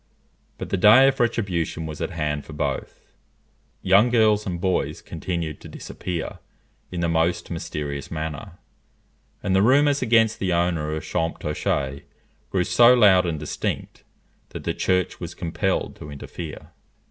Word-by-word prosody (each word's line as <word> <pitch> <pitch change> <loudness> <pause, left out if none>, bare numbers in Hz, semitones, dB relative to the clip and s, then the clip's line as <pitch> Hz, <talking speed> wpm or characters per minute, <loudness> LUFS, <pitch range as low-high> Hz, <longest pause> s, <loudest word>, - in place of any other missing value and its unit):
But - - -6
the 100 - +1
day 110 +8 +7
of 135 0 +1
retribution 90 -9 -1
was 75 -1 -7
at - - -1
hand 75 -3 -2
for 80 - -11
both. 70 -2 -4 0.8
Young 100 +6 +5
girls 110 -3 +3
and 90 -2 -3
boys 95 +1 -1
continued 85 -4 -5
to - - -10
disappear 85 -3 -6 0.5
in 90 -1 -3
the 85 - +1
most 85 +2 0
mysterious 75 -4 -4
manner; 80 -2 -5 0.9
and 95 -2 +1
the 95 - +4
rumours 140 +5 +4
against 115 -2 +3
the 95 -2 0
owner 85 -3 0
of 80 - -5
Champtocé 75 -3 -2 0.5
grew 95 -2 +1
so 120 +6 +6
loud 95 -6 +5
and 80 -3 -2
distinct, 75 - -4 0.5
that - - -8
the - - -1
Church 90 -1 0
was - - -7
compelled 90 +3 -2
to 75 - -9
interfere. 75 +2 -8
90 Hz, 145 wpm, -23 LUFS, 80-105 Hz, 0.9 s, day